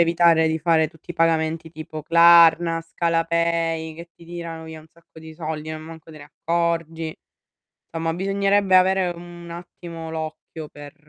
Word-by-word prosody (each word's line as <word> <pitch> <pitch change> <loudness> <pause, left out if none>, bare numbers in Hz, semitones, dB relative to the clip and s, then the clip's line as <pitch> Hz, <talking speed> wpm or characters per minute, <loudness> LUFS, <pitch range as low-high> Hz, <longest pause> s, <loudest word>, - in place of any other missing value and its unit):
evitare 170 -1 +4
di 160 0 -1
fare 160 -1 +2
tutti 160 +2 -16
i - - -22
pagamenti 165 -1 0
tipo 155 -1 -8
Klarna, 170 0 +6
Scalapay 165 -1 -1
che 170 +1 -11
ti 170 - -18
tirano 170 -1 -7
via 160 0 -9
un 155 - -19
sacco 165 -1 -18
di 160 0 -11
soldi, 155 -1 -5
non 155 0 -6
manco 160 0 -12
te 155 - -12
ne 145 - -11
accorgi. 165 +1 -2 0.8
Somma 165 0 -2
bisognerebbe 195 +1 +2
avere 185 0 +4
un 175 0 -11
attimo 170 -1 -9
l'occhio 160 0 -7
per 145 -1 -12
165 Hz, 155 wpm, -22 LUFS, 160-170 Hz, 0.8 s, Klarna